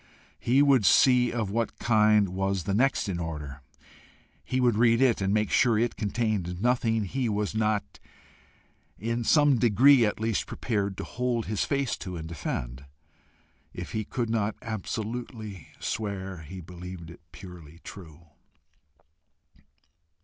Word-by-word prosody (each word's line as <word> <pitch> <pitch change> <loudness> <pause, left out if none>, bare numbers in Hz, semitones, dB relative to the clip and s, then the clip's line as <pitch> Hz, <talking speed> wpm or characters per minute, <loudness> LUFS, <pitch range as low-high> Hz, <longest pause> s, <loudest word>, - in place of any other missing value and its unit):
He 135 +4 +3
would 135 -5 +4
see 125 +4 +5
of 110 -5 -2
what 115 +1 -2
kind 105 -3 +3
was 95 0 -1
the 100 - -2
next 130 +4 +1
in 90 -3 -3
order; 75 -4 -6 0.8
he 130 - -2
would 120 -3 +3
read 115 +1 +4
it 130 -6 +3
and 95 0 0
make 105 0 +1
sure 120 -4 +3
it 120 +2 0
contained 105 -5 -2
nothing 115 -1 +1
he 120 +5 -2
was 105 0 -1
not, 110 -8 -1 1.0
in 115 +4 -2
some 145 0 +4
degree 120 +4 +5
at 105 -1 0
least, 110 -2 -1
prepared 100 -4 -2
to - - -4
hold 120 -2 -2
his 105 -1 -1
face 140 -3 -1
to 90 -4 -6
and 80 0 -6
defend 65 -5 -5 0.9
if - - -6
he 110 - -2
could 115 +2 -3
not 110 -2 0
absolutely 110 - -5
swear 95 -5 -4
he 85 +4 -9
believed 90 0 -9
it 85 - -15
purely 85 -4 -12
true. 85 -5 -11
105 Hz, 140 wpm, -27 LUFS, 95-120 Hz, 1.0 s, see